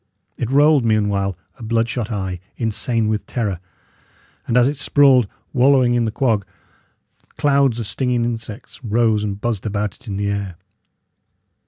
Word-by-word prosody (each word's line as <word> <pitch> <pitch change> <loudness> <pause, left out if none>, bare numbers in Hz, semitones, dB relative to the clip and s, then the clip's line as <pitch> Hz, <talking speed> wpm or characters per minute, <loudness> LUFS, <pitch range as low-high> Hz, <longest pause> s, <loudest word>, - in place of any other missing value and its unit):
It 120 - -3
rolled, 145 0 +4
meanwhile, 100 -4 0 0.2
a - - -9
blood 115 +1 +1
shot 120 -2 -3
eye, 95 -4 -3 0.2
insane 115 0 0
with 110 -1 -1
terror; 105 -7 -2 0.9
and 120 - +1
as 125 0 +5
it 145 +1 -2
sprawled 135 -4 +4 0.3
wallowing 130 -1 +4
in 120 -1 +1
the 110 - -1
quag, 110 -4 +1 0.9
clouds 140 -4 +2
of 115 - -3
stinging 125 +1 0
insects 115 +1 -6
rose 110 -1 +1
and 100 -1 -3
buzzed 110 -2 -2
about 105 -1 -2
it 130 - -20
in 100 -2 -4
the 100 0 -1
air. 100 -3 -4
115 Hz, 155 wpm, -20 LUFS, 105-125 Hz, 0.9 s, as